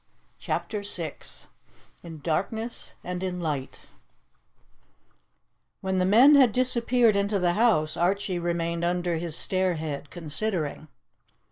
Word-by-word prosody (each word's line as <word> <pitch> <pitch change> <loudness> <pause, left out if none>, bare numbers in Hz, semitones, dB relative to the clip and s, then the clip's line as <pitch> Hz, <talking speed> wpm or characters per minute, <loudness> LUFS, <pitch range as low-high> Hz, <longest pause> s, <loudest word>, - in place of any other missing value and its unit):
CHAPTER 210 - -3
VI 170 -6 -4 0.9
IN 160 -3 -10
DARKNESS 220 +9 -3
AND 180 0 -4
IN 185 -1 -3
LIGHT 150 -6 -4 2.0
WHEN 190 -1 -1
the 185 - +2
men 240 +10 +7
had 265 -5 +6
disappeared 245 -2 +2
into 200 +1 +1
the 175 -2 +1
house, 185 -8 +2
Archie 185 +1 0
remained 170 0 -2
under 175 -1 0
his 165 -1 -3
stairhead 160 -6 -1
considering. 160 -1 -2
180 Hz, 110 wpm, -26 LUFS, 165-210 Hz, 2.0 s, men